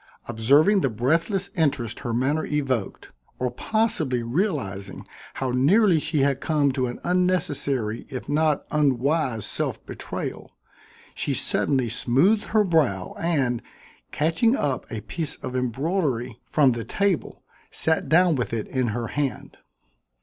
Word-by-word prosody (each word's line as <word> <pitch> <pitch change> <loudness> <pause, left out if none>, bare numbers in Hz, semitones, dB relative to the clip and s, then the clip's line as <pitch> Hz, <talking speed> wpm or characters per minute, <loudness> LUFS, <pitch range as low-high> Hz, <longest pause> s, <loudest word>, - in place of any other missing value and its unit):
Observing 140 - +4
the 135 - +1
breathless 165 - 0
interest 140 -8 0
her 120 - -4
manner 135 +7 0
evoked, 130 -8 -2 0.3
or 125 -1 -1
possibly 155 - 0
realizing 120 - -2 0.3
how 130 -1 -2
nearly 165 - +4
she 150 -1 -1
had 135 -1 +1
come 150 -3 +2
to 130 -1 -1
an 120 - -6
unnecessary 145 -11 0
if 130 - -6
not 150 0 +1
unwise 140 -4 +1
self - - -2
betrayal, - - -6 0.6
she - - -2
suddenly 130 -3 +1
smoothed 135 - +2
her 215 -1 +3
brow 145 - +1
and, 135 -8 0 0.5
catching 170 - +2
up 140 - -2
a 110 -3 -4
piece 160 +4 -4
of 130 - -7
embroidery 130 - -1
from 140 -4 +4
the 115 -1 -3
table, 200 - -1 0.3
sat 160 -4 0
down 175 +2 +5
with 125 -5 -2
it 110 -2 -2
in 130 -2 0
her 115 +2 -2
hand. 145 -3 -3
140 Hz, 135 wpm, -24 LUFS, 120-165 Hz, 0.6 s, down